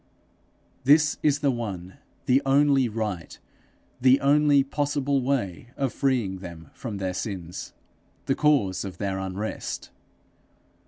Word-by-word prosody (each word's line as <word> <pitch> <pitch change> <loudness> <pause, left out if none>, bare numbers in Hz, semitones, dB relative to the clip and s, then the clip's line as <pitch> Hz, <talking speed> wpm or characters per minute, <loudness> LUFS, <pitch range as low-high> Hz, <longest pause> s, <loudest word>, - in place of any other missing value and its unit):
This 150 +3 +4
is 145 -1 +2
the 140 -2 +3
one, 95 -7 -5 0.3
the 130 +2 +4
only 135 -2 +4
right, 105 -6 -4 0.6
the 130 +1 +6
only 145 0 +4
possible 140 -1 0
way 125 -7 -1
of 135 -3 -1
freeing 120 -9 0
them 85 -4 -10
from 110 -6 -6
their 95 -1 -2
sins, 90 -3 -5 0.5
the - - +2
cause 135 -12 +2
of 95 -3 -7
their 95 -1 -2
unrest. 95 +3 -4
125 Hz, 120 wpm, -26 LUFS, 95-140 Hz, 0.6 s, the